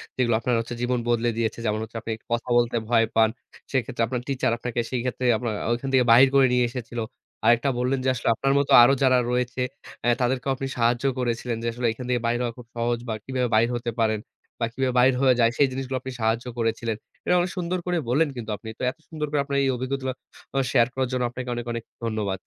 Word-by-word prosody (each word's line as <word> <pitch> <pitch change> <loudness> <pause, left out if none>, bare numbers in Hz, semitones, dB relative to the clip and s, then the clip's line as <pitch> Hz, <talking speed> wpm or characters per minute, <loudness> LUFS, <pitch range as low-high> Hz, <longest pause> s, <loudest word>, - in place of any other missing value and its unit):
যেগুলো 120 -3 +2
আপনার 120 +2 -1 0.3
জীবন 125 0 0
বদলে 120 0 +2
দিয়েছে। 115 0 -1
যেমন 105 0 0
হচ্ছে, 115 +1 -8
আপনি 115 - -5 0.2
কথা 120 +1 -1
বলতে 120 0 +2
ভয় 115 -1 +4
পান। 110 -1 +5 0.4
সেক্ষেত্রে 120 -3 -1
আপনার 125 +1 -3
টিচার, 135 -4 0
আপনাকে 120 0 -3
সেক্ষেত্রে 125 0 -2
আপনার 120 -1 -3 0.2
ঐখান 120 +3 -1
থেকে 125 -2 +5
বাহির 130 +4 +8
করে 135 -1 +7
নিয়ে 125 -1 +3
এসেছিল। 120 -1 -6 0.5
আরেকটা 120 +4 +4
বললেন 130 +2 +1
যে, - - -1
আসলে 120 - -5
আপনার 135 +4 +1
মতো 140 - -1
আরো 135 +3 +6
যারা 130 -1 +5
রয়েছে, 125 0 -1 0.4
এ - - +4
তাদেরকেও 130 +2 0
আপনি 135 +1 -4
সাহায্য 120 +2 +2 0.2
করেছিলেন 120 -1 -1
যে 115 - -1
আসলে 120 0 -1
এখান 125 +3 -7
থেকে 120 -2 +1
বাইর 120 +1 +1
হওয়া 120 -1 -2
খুব 120 -2 -12
সহজ 120 0 0
বা - - 0
কিভাবে 130 -1 -1
বাহির 115 +2 +4
হতে 120 0 -3
পারেন 110 -1 +2 0.4
বা 115 - +1
কিভাবে 130 -1 0
বাহির 130 +2 +5
হয়ে 130 -2 +5
যায়, 115 0 +4
সেই 140 - +5
জিনিসগুলো 130 0 -3
আপনি 130 0 -6
সাহায্য 115 +2 +1
করেছিলেন। 115 0 -1 0.3
এটা 180 - +3
অনেক 175 0 0
সুন্দর 180 +1 -1
করে 180 -1 0
বললেন 150 +5 +3
কিন্তু 115 -3 -6
আপনি 110 - -9
তো - - -4
এত - - -22
সুন্দর 155 -2 -3
করে, 145 -1 +1
আপনার 140 -1 -1
এই 135 - +2
অভিজ্ঞতা 130 +2 -3 0.5
গুলো 135 - +1
শেয়ার 120 -3 +4
করার 130 -1 0
জন্য, 125 -1 0
আপনাকে 125 0 -6
অনেক, 120 0 -4
অনেক 115 -1 -4 0.2
ধন্যবাদ। 105 -4 -2
125 Hz, 220 wpm, -25 LUFS, 115-130 Hz, 0.5 s, বাহির